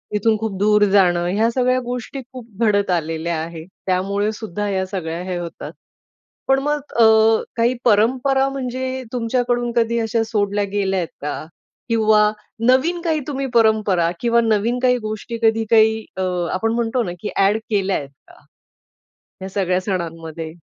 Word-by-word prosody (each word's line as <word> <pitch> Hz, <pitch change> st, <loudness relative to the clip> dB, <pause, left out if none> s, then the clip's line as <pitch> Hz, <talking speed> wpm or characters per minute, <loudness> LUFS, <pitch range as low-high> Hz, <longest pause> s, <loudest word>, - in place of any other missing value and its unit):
इथून 215 Hz, +1 st, +2 dB
खूप 215 Hz, -3 st, -4 dB
दूर 210 Hz, +1 st, +4 dB
जाणं, 175 Hz, -3 st, +3 dB
ह्या 225 Hz, +2 st, +3 dB
सगळ्या 255 Hz, +1 st, +1 dB
गोष्टी 245 Hz, +2 st, -5 dB
खूप 250 Hz, -3 st, -10 dB, 0.2 s
घडत 205 Hz, -3 st, +2 dB
आलेल्या 165 Hz, 0 st, -1 dB
आहे. 165 Hz, -1 st, -8 dB, 0.2 s
त्यामुळे 200 Hz, +3 st, 0 dB
सुद्धा 210 Hz, -2 st, -5 dB
या 190 Hz, -1 st, -1 dB
सगळ्या 175 Hz, -3 st, -4 dB
हे 185 Hz, -1 st, -3 dB
होतात. 170 Hz, -1 st, -7 dB, 0.8 s
पण 270 Hz, 0 st, +4 dB
मग 295 Hz, +1 st, 0 dB, 0.2 s
अ, -, -, +8 dB, 0.5 s
काही 235 Hz, +2 st, +2 dB
परंपरा 255 Hz, +5 st, +3 dB
म्हणजे 260 Hz, -1 st, -4 dB
तुमच्याकडून 240 Hz, 0 st, 0 dB
कधी 235 Hz, 0 st, +2 dB
अशा 225 Hz, 0 st, 0 dB
सोडल्या 205 Hz, -1 st, 0 dB
गेल्यात 195 Hz, -4 st, 0 dB
का? 145 Hz, +1 st, -4 dB, 0.4 s
किंवा 215 Hz, -2 st, +4 dB, 0.4 s
नवीन 320 Hz, +8 st, +3 dB
काही 320 Hz, -3 st, 0 dB
तुम्ही 275 Hz, -2 st, -3 dB
परंपरा 215 Hz, -7 st, +3 dB
किंवा 235 Hz, -1 st, +3 dB
नवीन 225 Hz, +1 st, +1 dB
काही 250 Hz, -1 st, +4 dB
गोष्टी 215 Hz, +1 st, -5 dB
कधी 225 Hz, 0 st, +3 dB
काही 220 Hz, -1 st, +4 dB
अ, 190 Hz, -, -2 dB, 0.3 s
आपण 225 Hz, +4 st, 0 dB
म्हणतो 235 Hz, +1 st, 0 dB
ना 180 Hz, -6 st, -4 dB
की 210 Hz, -, -4 dB
ॲड 200 Hz, +2 st, +3 dB
केल्यायेत 195 Hz, -8 st, 0 dB, 0.2 s
का, -, -, -19 dB, 1.0 s
या 190 Hz, -, -5 dB
सगळ्या 185 Hz, -2 st, 0 dB
सणांमध्ये? 165 Hz, -4 st, -5 dB
215 Hz, 150 wpm, -20 LUFS, 190-240 Hz, 1.0 s, अ